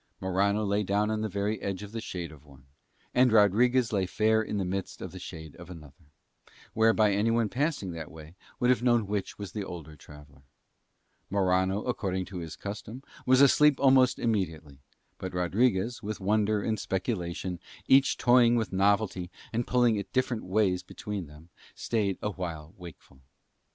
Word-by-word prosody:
Morano 100 +3 +1
lay 100 +1 +1
down 105 +2 0
on 110 0 -1
the 110 - -2
very 100 +2 -2
edge 100 0 -4
of 105 - -9
the 115 0 -5
shade 85 -6 -6
of 75 -2 -15
one, 70 -2 -18 0.5
and 125 -1 +4
Rodriguez 115 +3 +4
lay 95 -3 +1
fair 110 +3 +2
in 105 -1 -3
the 95 - -1
midst 95 +1 -4
of - - -7
the - - -9
shade 80 -2 -9
of 90 0 -12
another, 75 -3 -13 0.7
whereby 110 -1 +4
anyone 115 +2 +1
passing 135 - -1
that 80 -2 -7
way 80 0 -12 0.3
would 125 +1 +3
have 125 - +1
known 120 -3 +3
which 100 0 -3
was 100 -2 -7
the 105 - -4
older 80 -4 -8
traveller. 75 -2 -15 0.9
Morano, 95 +1 +1
according 95 -6 -2
to 95 0 -8
his 80 -2 -7
custom, 105 +5 -7 0.2
was 130 +1 +5
asleep 145 +1 +5
almost 130 -2 +5
immediately; 80 - -2 0.4
but 95 -1 -6
Rodriguez, 105 +5 +1
with 105 0 -5
wonder 105 +1 +1
and 110 -1 -1
speculation 90 -3 -3 0.3
each 135 +1 +5
toying 120 -1 +5
with 110 -4 -1
novelty 95 -2 +1 0.2
and 120 +1 -1
pulling 120 -3 +3
it 100 - -5
different 125 -3 0
ways 95 -1 +1
between 95 -1 -6
them, 75 +3 -15 0.3
stayed 105 -5 -1
awhile 85 -6 -5
wakeful. 85 -6 -13
100 Hz, 165 wpm, -28 LUFS, 90-110 Hz, 0.9 s, was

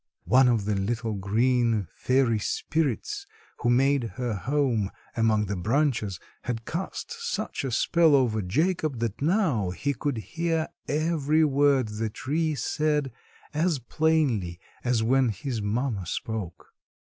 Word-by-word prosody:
One 130 +2 +5
of 115 -5 +2
the 105 - 0
little, 110 +3 -1
green 115 +2 +1
fairy 125 -4 +2
spirits 400 - -2 0.3
who 120 - +1
made 135 +1 +3
her 125 -3 -2
home 115 - 0 0.3
among 110 -2 +2
the 100 +1 -3
branches 110 - 0 0.2
had 115 -2 -4
cast 185 - -4
such 470 - -3
a 135 - -1
spell 160 +6 +4
over 120 -5 +2
Jacob 155 - 0
that 115 -1 -3
now 155 - +2
he 140 +10 -2
could 140 0 -2
hear 160 - -1 0.2
every 155 0 +2
word 140 -3 +3
the 110 +1 -2
tree 155 +7 -1
said 150 -1 0 0.4
as 160 +1 +1
plainly 125 - 0 0.2
as 120 -3 +1
when 130 +2 +3
his 120 0 -3
mamma 105 -2 -1
spoke. 105 -3 -5
125 Hz, 135 wpm, -26 LUFS, 110-150 Hz, 0.4 s, One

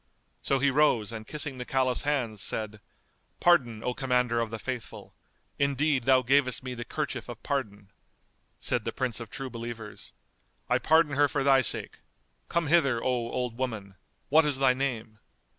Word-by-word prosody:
So 135 - +1
he 140 +1 +2
rose 130 -7 +2
and 110 -1 -7
kissing 145 -3 -4
the - - -3
Caliph's 130 -1 +1
hands, 125 -8 -1
said, 110 -1 -1 0.6
"Pardon, 125 -11 +3
O 125 - -1
Commander 125 -3 +1
of 115 -1 -1
the 115 - -5
Faithful! 125 +1 -7 0.5
Indeed, 140 -2 +1
thou 130 -1 +5
gavest 130 0 +2
me 130 -1 -5
the 120 -1 -5
kerchief 130 -3 -4
of 120 -1 -9
pardon." 105 -8 -3 0.7
Said - - -1
the - - -3
Prince 125 -3 -1
of 115 - -8
True 135 -2 -6
Believers, 115 -2 -7 0.6
"I - - +2
pardon 160 -2 +3
her 145 +1 +4
for 140 -1 -1
thy 135 -1 +5
sake: - - -2 0.5
come 170 -1 0
hither, 145 -6 +3
O - - -7
old 125 -1 -2
woman; 110 -7 -4 0.4
what 155 +3 +6
is 145 -3 0
thy 135 -1 +4
name?" 120 -5 -3
130 Hz, 170 wpm, -28 LUFS, 115-140 Hz, 0.7 s, what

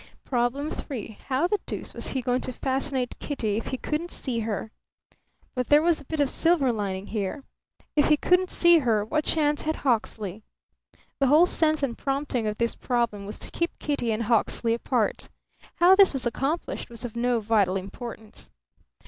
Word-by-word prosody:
Problem 260 +4 0
Three. 225 -6 -6
How 270 +4 +1
the 410 +3 +1
deuce - - -5
was - - -2
he 260 -2 -2
going 250 +1 +1
to 255 - -3
fascinate 265 0 -1
Kitty 220 -8 -2
if 225 - -4
he 260 - -2
couldn't 310 +6 -3
see 250 -8 -4
her? 220 -1 -3 0.8
But 250 -2 -2
there 295 +1 +5
was 335 -3 +2
a - - -15
bit 315 +3 -4
of 285 - +4
silver 315 -2 +2
lining 200 -3 -3
here. 210 +6 -3 0.5
If 295 - +4
he 300 - +5
couldn't 360 +4 +2
see 345 -1 +5
her, 225 -6 +1
what 305 +8 0
chance 295 -2 +1
had 315 +1 -1
Hawksley? 220 -5 -1 0.8
The 275 - +3
whole 305 +6 +6
sense 310 -4 +2
and 245 -4 0
prompting 270 -4 -2
of 210 0 -2
this 235 0 +1
problem 235 -5 -1
was 210 - -6
to - - -6
keep 340 0 -2
Kitty 285 -6 -1
and 220 +1 -1
Hawksley 230 0 +2
apart. 235 -1 -1 0.5
How 355 +2 +6
this 390 -3 +6
was 265 -2 -2
accomplished 275 +8 -2
was 235 +1 -7
of 235 - -7
no 240 0 +1
vital 205 -4 +2
importance. 215 +3 -9
250 Hz, 180 wpm, -26 LUFS, 225-295 Hz, 0.8 s, whole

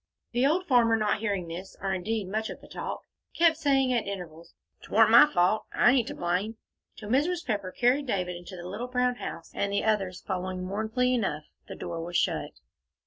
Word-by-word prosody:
The 245 +2 +2
old 355 +5 +1
farmer, 240 -6 +4
not 215 -1 +1
hearing 200 -5 -2
this, 180 +3 -8
or 195 0 -1
indeed 205 +2 -2
much 220 +3 -2
of - - -7
the - - -15
talk, - - -5 0.3
kept 335 -1 +5
saying 270 -4 +2
at 235 - 0
intervals, 170 -4 -8 0.3
"'Twarn't - - +4
my 300 - +9
fault. 185 +4 +2
I 245 - +5
ain't 250 -3 +2
to - - -5
blame," 185 +6 -1 0.4
till 210 - -8
Mrs. 320 +8 +1
Pepper 200 -5 -2
carried 255 +6 +2
David 180 -5 -1
into 175 +2 -9
the 175 0 -8
little 210 +7 -5
brown 250 0 0
house, - - -7
and 200 - -1
the 200 - 0
others, 195 -4 0
following 185 0 -3
mournfully 220 +6 0
enough, 190 -11 -1 0.2
the - - -7
door 165 -1 -5
was 175 +1 -2
shut. - - -1
215 Hz, 200 wpm, -28 LUFS, 185-250 Hz, 0.4 s, my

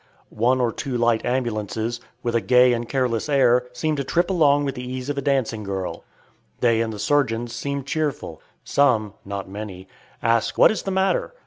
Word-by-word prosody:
One 125 +4 +2
or 120 -2 +1
two 130 +1 -4
light 115 -1 +2
ambulances, 115 -2 -2 0.2
with 120 - -1
a 115 - +2
gay 125 +1 +5
and 120 0 -3
careless 125 -1 -1
air, 125 -3 +3
seem 155 +5 -1
to 140 - -1
trip 175 +7 0
along 145 -5 +3
with 135 - -2
the 125 - -7
ease 130 +1 -5
of 145 - -2
a - - -3
dancing 130 -6 0
girl. 95 -2 -4 0.6
They 115 -2 +3
and 115 -1 -1
the 105 - -7
surgeons 120 -3 0
seem 140 +3 -3
cheerful. 140 - -3 0.2
Some, 115 -8 +2
not 100 0 -5
many, 95 -2 -8 0.4
ask 115 -1 +1
"What - - +7
is 215 - -3
the - - -4
matter?" 190 - 0
125 Hz, 190 wpm, -23 LUFS, 115-140 Hz, 0.6 s, What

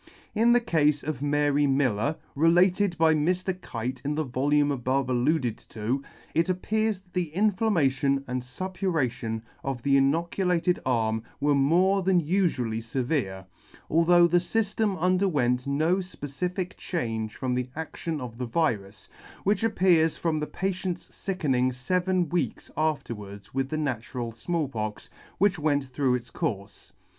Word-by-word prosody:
In 230 +2 +4
the 245 - +6
cafe 150 -10 +1
of 150 -4 -3
Mary 145 0 +2
Miller, 135 0 +1 0.2
related 175 +4 +3
by 160 -1 +5
Mr. 180 +4 0
Kite 125 +2 -4
in 145 +1 -1
the 155 - 0
volume 145 +2 +1
above 130 0 0
alluded 125 -1 +1
to, 115 +5 -2 0.3
it 165 +3 +2
appears 215 +3 0
that 185 -2 -31
the 180 -3 -1
inflammation 160 -10 +2
and 125 0 -2
fuppuration 130 - -2 0.2
of 135 -3 -3
the 140 -1 +4
inoculated 170 +5 +1
arm 110 -3 +1 0.2
were 145 0 +3
more 175 +8 +3
than 185 -1 +3
ufually 150 - 0
fevere, 115 - -2 0.5
although 170 +2 +5
the 175 +1 +4
fyflem 210 +2 0
under 185 +3 +2
went 125 -6 +1
no 155 +6 +2
fpecific 180 +1 -4
change 115 - -3
from 125 0 -2
the 125 0 -2
adtion 160 0 -4
of 120 -2 -7
the 125 - -2
virus; 105 - -1 0.4
which 205 +3 +1
appears 180 -7 +3
from 160 -2 0
the 150 - -3
patient's 185 -2 -3
fickening 145 -10 0
feven 180 +8 0
weeks 175 +2 -2
afterwards 115 -10 -3
with 135 0 -1
the 155 - -2
natural 125 -4 -3
Small 155 +7 -2
Pox, 110 -4 -5 0.3
which 195 -3 +2
went 145 -2 +1
through 130 -1 0
its 120 -1 -6
courfe. 100 -1 -4
150 Hz, 145 wpm, -27 LUFS, 125-180 Hz, 0.5 s, the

